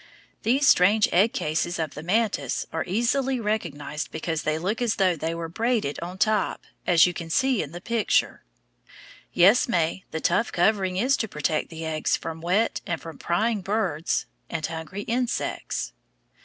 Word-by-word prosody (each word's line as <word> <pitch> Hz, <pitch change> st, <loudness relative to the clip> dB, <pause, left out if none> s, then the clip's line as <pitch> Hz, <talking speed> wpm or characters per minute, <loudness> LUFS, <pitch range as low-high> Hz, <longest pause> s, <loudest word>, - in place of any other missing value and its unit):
These 270 Hz, +4 st, +2 dB
strange 200 Hz, +4 st, +5 dB
egg 200 Hz, +6 st, +4 dB
cases 165 Hz, +3 st, -1 dB
of 160 Hz, -3 st, -3 dB
the 150 Hz, -, -7 dB
mantis 210 Hz, +6 st, 0 dB
are -, -, -1 dB
easily 250 Hz, +6 st, +1 dB
recognized 160 Hz, -9 st, -3 dB
because 160 Hz, -1 st, -3 dB
they 155 Hz, 0 st, 0 dB
look 195 Hz, +8 st, -2 dB
as 235 Hz, -3 st, +1 dB
though 185 Hz, -3 st, +2 dB
they 165 Hz, +1 st, -3 dB
were 165 Hz, 0 st, -4 dB
braided 220 Hz, -, -1 dB
on 180 Hz, +2 st, -6 dB
top, 215 Hz, 0 st, +1 dB, 0.2 s
as 170 Hz, -2 st, +6 dB
you 180 Hz, -, 0 dB
can 170 Hz, -1 st, -6 dB
see 260 Hz, +5 st, +2 dB
in 150 Hz, -, -6 dB
the 175 Hz, -, -7 dB
picture. 230 Hz, +1 st, +1 dB, 0.9 s
Yes, 200 Hz, +8 st, +5 dB
May, 170 Hz, -1 st, 0 dB
the 160 Hz, -, -4 dB
tough 185 Hz, +8 st, +1 dB
covering 185 Hz, 0 st, +1 dB
is 255 Hz, +7 st, +3 dB
to 220 Hz, -, -2 dB
protect 155 Hz, -3 st, -1 dB
the 160 Hz, -1 st, -6 dB
eggs 155 Hz, -1 st, 0 dB
from 160 Hz, 0 st, -6 dB
wet 190 Hz, +7 st, +1 dB
and 170 Hz, -2 st, -2 dB
from 165 Hz, -1 st, -10 dB
prying 210 Hz, +4 st, 0 dB
birds 190 Hz, -6 st, -1 dB, 0.2 s
and 160 Hz, -2 st, -2 dB
hungry 165 Hz, +5 st, -5 dB
insects. 240 Hz, +2 st, -2 dB
180 Hz, 170 wpm, -25 LUFS, 165-220 Hz, 0.9 s, as